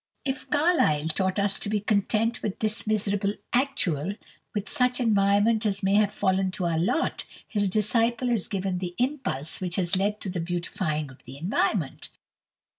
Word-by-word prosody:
If 270 Hz, 0 st, -3 dB
Carlyle 290 Hz, -, +2 dB
taught 185 Hz, +4 st, 0 dB
us 200 Hz, -1 st, +1 dB
to 205 Hz, -, -3 dB
be 210 Hz, 0 st, +1 dB
content 215 Hz, +3 st, +1 dB
with 205 Hz, -, -3 dB
this 215 Hz, 0 st, -1 dB
"miserable 205 Hz, -1 st, +1 dB, 0.2 s
actual," 200 Hz, -, 0 dB, 0.4 s
with 205 Hz, -1 st, -2 dB
such 250 Hz, -2 st, +1 dB
environment 210 Hz, 0 st, +3 dB
as 200 Hz, -2 st, 0 dB
may 195 Hz, +1 st, +2 dB
have 205 Hz, 0 st, +4 dB
fallen 190 Hz, -1 st, +1 dB
to 185 Hz, -, -2 dB
our 165 Hz, -2 st, +1 dB
lot, 190 Hz, -, 0 dB, 0.2 s
his 205 Hz, -3 st, 0 dB
disciple 230 Hz, +4 st, +1 dB
has 230 Hz, -6 st, 0 dB
given 190 Hz, -2 st, -2 dB
the 180 Hz, -1 st, -5 dB
impulse 245 Hz, -, 0 dB
which 180 Hz, -1 st, -2 dB
has 180 Hz, -1 st, +1 dB
led 205 Hz, +3 st, 0 dB
to 195 Hz, -, -3 dB
the 180 Hz, -, -3 dB
beautifying 165 Hz, -4 st, -2 dB
of 130 Hz, -, -16 dB
that 130 Hz, +2 st, -10 dB
environment. 170 Hz, -1 st, -1 dB
200 Hz, 170 wpm, -26 LUFS, 180-220 Hz, 0.4 s, have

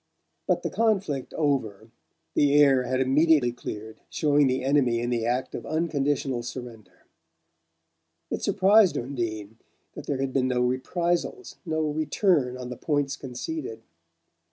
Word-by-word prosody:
But -, -, +1 dB
the -, -, -2 dB
conflict 195 Hz, -, 0 dB
over, 115 Hz, -8 st, -1 dB, 0.4 s
the 145 Hz, -1 st, +3 dB
air 135 Hz, -3 st, +5 dB
had 130 Hz, 0 st, -1 dB
immediately 135 Hz, 0 st, +3 dB
cleared, 110 Hz, -2 st, -8 dB
showing 145 Hz, -2 st, +2 dB
the 130 Hz, 0 st, 0 dB
enemy 130 Hz, -4 st, +2 dB
in 120 Hz, +1 st, -2 dB
the 115 Hz, -1 st, 0 dB
act 125 Hz, +2 st, -1 dB
of -, -, -5 dB
unconditional 145 Hz, -5 st, -1 dB
surrender. 120 Hz, -3 st, -9 dB, 1.3 s
It -, -, -2 dB
surprised 200 Hz, 0 st, +4 dB
Undine 115 Hz, -4 st, -4 dB, 0.3 s
that -, -, -9 dB
there 140 Hz, -, -1 dB
had 135 Hz, -1 st, -2 dB
been 130 Hz, -1 st, +2 dB
no 125 Hz, -1 st, 0 dB
reprisals, 170 Hz, -, -1 dB
no 160 Hz, 0 st, 0 dB
return 150 Hz, -3 st, +1 dB
on 125 Hz, -1 st, -7 dB
the 125 Hz, -, -6 dB
points 145 Hz, 0 st, -1 dB
conceded. 130 Hz, -3 st, -6 dB
135 Hz, 135 wpm, -26 LUFS, 125-155 Hz, 1.3 s, air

